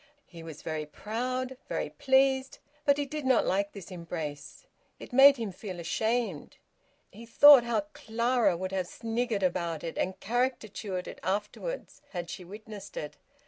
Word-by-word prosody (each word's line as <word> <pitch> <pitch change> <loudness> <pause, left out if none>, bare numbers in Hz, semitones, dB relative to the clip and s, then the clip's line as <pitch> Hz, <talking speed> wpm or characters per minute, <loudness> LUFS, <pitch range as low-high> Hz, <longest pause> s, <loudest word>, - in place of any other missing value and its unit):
He 170 -2 -12
was 160 -2 -10
very 155 -2 -3
proud, 250 - -3
very - - -2
pleased, 265 -1 +2 0.3
but 280 -1 +4
he 290 - 0
did 300 +2 -5
not 260 -2 +3
like 200 +2 0
this 195 -2 -10
embrace; 160 -4 -6 0.3
it - - -11
made 275 +2 +8
him 225 -4 -3
feel 185 -1 -7
ashamed. 220 0 -1 0.5
He 230 +4 -12
thought 285 +2 +9
how 235 +4 +1
Clara 235 -3 +1
would 185 +1 -4
have 185 -2 -1
sniggered 225 -1 -2
about 170 -3 -1
it 165 - -5
and 185 0 -2
caricatured 220 -5 -2
it - - -8
afterwards, 210 - -4
had 175 -2 -4
she 185 - -7
witnessed 205 +1 -10
it. 150 - -5
210 Hz, 155 wpm, -29 LUFS, 180-250 Hz, 0.5 s, thought